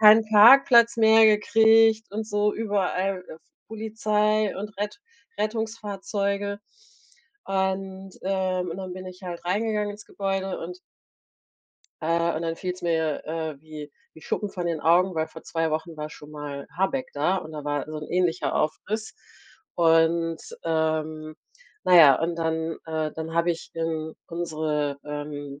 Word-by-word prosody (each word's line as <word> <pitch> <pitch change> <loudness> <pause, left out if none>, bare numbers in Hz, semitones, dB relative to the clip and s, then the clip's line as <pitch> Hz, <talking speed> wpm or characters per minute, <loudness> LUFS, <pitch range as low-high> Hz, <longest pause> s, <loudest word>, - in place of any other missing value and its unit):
keinen 220 +1 +8
Parkplatz 235 +2 +7
mehr 220 0 +6
gekriegt 220 0 +4
und 215 +1 -3
so 210 0 +1
überall, 195 -3 -1
äh, - - -8
F 160 - -17 0.3
Polizei 215 -1 0
und 205 +1 -7
Rett 210 - -4 0.4
Rettungsfahrzeuge. 205 -2 -2 0.9
Und 190 0 -2
äh, 190 -1 0
und 175 -1 -5
dann 190 -1 -6
bin 185 0 -8
ich 185 +1 -11
halt 175 -1 -7
reingegangen 210 +2 -1
ins 205 +1 -12
Gebäude 195 -1 -3
und 180 +2 -7 1.2
äh, 170 +1 +1
und 160 - -3
dann 165 0 -2
fiel's 180 0 -5
mir, 160 -3 0
äh, 160 -2 -4
wie 155 -1 -9 0.2
wie 160 - -14
Schuppen 210 - -2
von 175 -2 -4
den 165 -3 -2
Augen, 180 +4 +3
weil 160 -1 0
vor 160 - -12
2 165 -1 -1
Wochen 160 +1 -3
war 150 0 -5
schon 150 0 -12
mal 145 -2 -7
Habeck 225 +9 0
da 155 +7 +1
und 160 -3 -6
da 150 -1 -7
war 145 -1 -1
so 155 0 -6
'n 150 - -8
ähnlicher 180 -1 0
Aufriss. 215 +8 -2 0.6
Und 165 0 +3 0.2
ähm, 155 -1 -1 0.5
na 180 - +5
ja, 145 -6 +8
und 170 +1 -1
dann 160 0 -2
äh, 155 -1 -2
dann 160 0 -6
habe 170 +1 +2
ich 165 - -5
in 160 -1 -3
unsere, 155 -4 -2
ähm, 145 -1 -6
180 Hz, 150 wpm, -25 LUFS, 160-205 Hz, 1.2 s, keinen